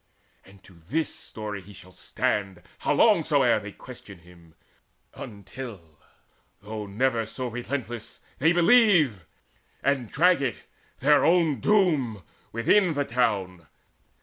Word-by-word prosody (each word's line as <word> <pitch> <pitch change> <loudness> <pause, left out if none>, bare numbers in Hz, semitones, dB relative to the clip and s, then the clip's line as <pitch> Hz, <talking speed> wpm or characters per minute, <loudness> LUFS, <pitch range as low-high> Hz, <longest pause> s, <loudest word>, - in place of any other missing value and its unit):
And 95 0 -19
to 95 - -17 0.2
this 160 +5 -1
story 105 -2 -6
shall 95 -1 -14
he 95 - -22
stand, 95 -4 -2 0.2
How - - -1
long - - +4
soe'er - - +3
they - - -9
question - - -12
him, 85 -2 -19 0.6
until, 100 -6 -10 0.6
Though 105 0 -7
never 115 +2 0
so 130 +3 -5
relentless, 120 -1 -6 0.2
they 160 +4 +4
believe, 175 - +4 0.6
And 135 -5 0
drag 180 -2 +3
it, 130 -3 -3 0.4
their 145 +2 +4
own 165 -6 +3
doom, 150 - +1 0.3
within 165 - +2
the 145 0 0
town. 95 -9 -1
115 Hz, 120 wpm, -26 LUFS, 100-150 Hz, 0.6 s, long